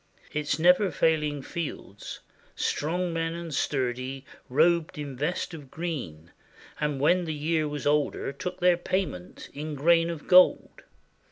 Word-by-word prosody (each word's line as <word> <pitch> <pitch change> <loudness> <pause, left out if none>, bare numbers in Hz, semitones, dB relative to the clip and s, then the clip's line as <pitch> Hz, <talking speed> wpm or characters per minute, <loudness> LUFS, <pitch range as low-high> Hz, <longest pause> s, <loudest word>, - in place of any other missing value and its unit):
Its 150 -1 -1
never 180 +4 +5
failing 150 -2 +1
fields 150 - -6 0.3
Strong 175 +3 -1
men 165 0 -1
and 170 -2 -6
sturdy 130 0 -2 0.2
robed 165 +4 +2
in 145 -3 -5
vest 150 +6 -2
of 145 -5 -9
green, 130 - -5 0.5
And 150 -2 -1
when 175 +5 +3
the 160 -2 -3
year 155 +1 0
was 145 -1 -5
older 145 -1 +1
took 180 +4 -5
their 180 -1 +5
payment 175 - -3
In 150 +1 -5
grain 165 +4 +4
of 165 -3 -6
gold. 185 0 +5
155 Hz, 140 wpm, -27 LUFS, 140-170 Hz, 0.5 s, never